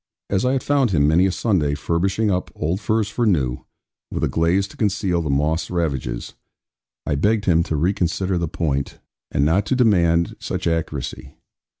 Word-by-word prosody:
As 95 +3 +1
I 130 - +2
had 135 - -1
found 140 -4 +2
him 75 -6 +3
many 85 +5 +4
a - - 0
Sunday, 85 -9 0
furbishing 95 +7 0
up 90 0 -1
old 85 +6 -2
furs 110 +1 +1
for 120 +4 -2
new, 65 -10 0 0.4
with - - -3
a - - +3
glaze 85 +4 +1
to - - -14
conceal 100 -4 0
the 80 - -3
moths' 80 +4 0
ravages, 70 -9 -2 0.7
I - - 0
begged 105 +8 +1
him 85 -3 +4
to 80 - -2
reconsider 90 +2 0
the 85 - -1
point, 70 -4 -2 0.3
and 70 - +1
not 95 +6 +2
to - - +1
demand 85 -9 +2
such - - -4
accuracy. 80 -1 -3
85 Hz, 180 wpm, -21 LUFS, 80-100 Hz, 0.7 s, many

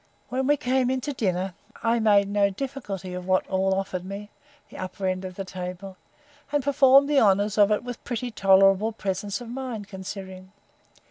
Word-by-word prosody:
When 260 +1 -1
we 290 +1 +4
came 255 -2 +1
in 260 0 0
to 290 +3 -3
dinner, 190 -5 -1 0.3
I 230 0 +2
made 205 -2 +4
no 200 0 +2
difficulty 200 -5 -5
of 180 0 -6
what 185 0 +2
all 190 0 +1
offered 190 -2 -3
me, 200 +2 -7 0.4
the - - -10
upper 185 +1 -5
end 185 0 -1
of 185 -1 -7
the 195 - -5
table; 185 +1 -7 0.6
and 290 -2 +1
performed 275 0 +5
the 290 -1 +4
honours 205 -1 +3
of 205 0 +5
it 210 - +1
with 245 -1 -7
pretty 240 0 -4
tolerable 195 +1 +4
presence 200 +1 -3
of 240 - -8
mind, 245 -5 -5
considering. 190 -1 -8
200 Hz, 185 wpm, -25 LUFS, 190-245 Hz, 0.6 s, performed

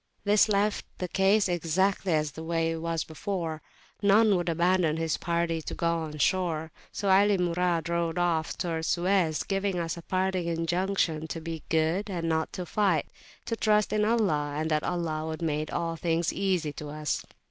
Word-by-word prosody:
This 205 +1 +4
left 205 0 +1
the 180 - -3
case 195 +3 +3
exactly 180 +2 0
as 150 -2 0
it 160 - -6
was 165 0 -1
before; 160 -1 -4 0.4
none 205 +1 +5
would 175 -1 -1
abandon 170 -1 +2
his 165 -1 0
party 170 -1 -1
to - - -6
go 170 0 0
on 155 -2 -5
shore: 160 -1 0 0.2
so 200 -2 0
Ali 200 +1 +5
Murad 175 -2 0
rowed 170 0 -1
off 170 -3 0
towards 165 -2 -2
Suez, 175 -3 +1
giving 195 -1 -1
us 170 0 -2
a - - -7
parting 185 0 -1
injunction 165 -1 0
to 165 - -5
be 165 -1 -6
good, 160 +6 +1
and 170 -3 -2
not 160 -1 -1
fight; 185 -5 +1 0.4
to 230 - -2
trust 210 -2 +2
in 210 0 +2
Allah, 185 -11 +1
and 160 +1 -1
that 155 0 +2
Allah 160 -3 -2
would 160 +1 -4
make 155 -1 -1
all 165 -1 -2
things 165 0 0
easy 180 -6 0
to 150 0 -7
us. 150 0 -2
170 Hz, 170 wpm, -28 LUFS, 160-190 Hz, 0.4 s, none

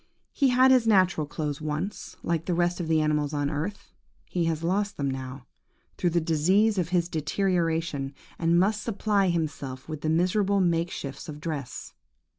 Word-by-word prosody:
He 280 - +2
had 255 +1 +5
his 250 -3 +4
natural 185 -7 +3
clothes 150 0 -4
once, 155 +6 -4
like 170 -1 -1
the 175 - 0
rest 175 +1 +1
of 170 - -3
the 160 -1 +3
animals 150 -1 0
of 145 0 0
the 145 - -1
earth; 175 +8 -4 0.3
he 175 -2 -1
has 165 -1 -1
lost 200 +4 0
them 140 -1 -1
now, 130 0 -6 0.5
through 175 - +1
the 170 +1 +2
disease 185 +7 +2
of 175 -2 -1
his 175 -1 +1
deterioration, 165 -4 -1 0.2
and 170 +1 +3
must 210 +3 +2
supply 205 -3 +1
himself 145 -6 -3
with 155 -2 -6
the 155 - -1
miserable 190 +5 +2
make 170 -2 +2
shifts 140 +2 -6
of 150 -1 -7
dress. 150 -5 -5
165 Hz, 180 wpm, -27 LUFS, 150-190 Hz, 0.5 s, had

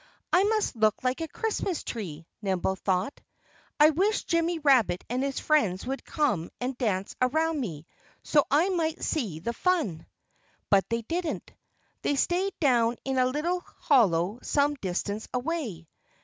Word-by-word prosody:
"I 360 - +6
must 430 - +1
look 215 0 +2
like 255 +5 0
a 325 - -2
Christmas 395 -2 -2
tree," 165 -9 -6 0.2
Nimble 190 -2 0
thought. 190 +6 -1 0.6
"I 300 +1 +7
wish 390 +7 +1
Jimmy 335 0 +1
Rabbit 265 - +3
and 250 +1 0
his 275 0 -1
friends 215 - +1
would 270 +2 -4
come 210 - 0
and 250 +1 -2
dance 200 -6 -1
around 315 +5 +2
me 165 - -5 0.4
so 295 -2 +4
I 315 +7 +3
might 330 -4 -1
see 220 - -1
the 235 +7 -2
fun." 265 - 0 0.6
But 195 -1 +4
they 230 0 -1
didn't. 335 +6 -3 0.5
They 285 - +1
stayed 360 +7 0
down 240 -5 +3
in 265 -1 0
a 255 - +4
little 315 +7 -1
hollow 210 - +2
some 290 0 +2
distance 200 -2 -3
away. 250 - -3
260 Hz, 150 wpm, -28 LUFS, 205-320 Hz, 0.6 s, I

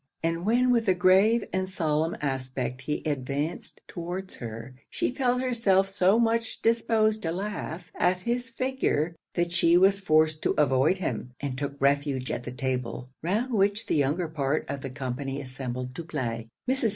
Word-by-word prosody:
And 165 +3 -1
when 250 +3 +4
with 230 -3 +2
a 185 - +4
grave 195 +5 +5
and 185 0 -1
solemn 160 -3 0
aspect 130 -2 -3
he 150 +3 -3
advanced 145 +2 -2
towards 180 +2 -5
her, 115 +1 -7 0.2
she - - -1
felt 250 -1 +1
herself 225 -7 +2
so 195 +1 +3
much 230 -1 +1
disposed 220 -1 +2
to 165 - -2
laugh 185 -2 -5
at 180 0 +1
his 240 +3 -1
figure, 230 - 0 0.2
that 175 -1 0
she 170 -1 +4
was 195 +2 +5
forced 155 -4 +3
to - - +1
avoid 140 +4 +3
him, 125 - -3
and 140 -2 -3
took 140 +1 -4
refuge 140 -2 +1
at 120 0 -4
the 125 - -4
table, 125 -1 -3
round 215 +10 -1
which 205 +2 +2
the - - 0
younger 150 +4 +1
part 150 -1 -1
of 140 0 -4
the 135 - -5
company 135 +1 -4
assembled 130 -2 -5
to 170 - -6
play. 115 -8 -3 0.2
Mrs. 260 -3 +2
165 Hz, 170 wpm, -27 LUFS, 135-205 Hz, 0.2 s, grave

